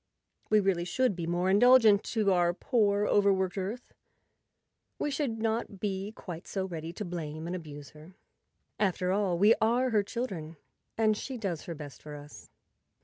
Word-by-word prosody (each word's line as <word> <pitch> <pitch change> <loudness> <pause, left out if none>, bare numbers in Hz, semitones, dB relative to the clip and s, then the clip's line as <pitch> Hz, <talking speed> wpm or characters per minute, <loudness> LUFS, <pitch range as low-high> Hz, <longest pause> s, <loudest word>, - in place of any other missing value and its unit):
We 215 - +5
really 190 -4 +1
should 250 +4 0
be 170 -2 -4
more 175 +2 0
indulgent 215 0 +6
to 215 -3 +1
our 175 -1 +2
poor, 205 -3 +1
overworked 190 -3 +2
Earth; 205 +6 -5 1.0
we 295 - -2
should 275 -5 -2
not 220 -2 -2
be 195 0 -3
quite 175 -2 -8
so 190 -2 -2
ready 165 -3 -6
to 210 - -5
blame 160 -3 -5
and 175 +2 -3
abuse 145 -5 -9
her. 155 +4 -15 0.6
After 185 -2 +1
all, 195 -3 +1
we 205 +5 +6
are 245 +3 +2
her 210 -2 +3
chil¬ 235 +4 -3
dren 165 -7 -8 0.4
and 215 -1 +3
she 260 +4 -6
does 190 -8 -4
her 170 - -5
best 145 -2 -10
for 150 -1 -9
us. 145 0 -12
195 Hz, 170 wpm, -29 LUFS, 170-215 Hz, 1.0 s, indulgent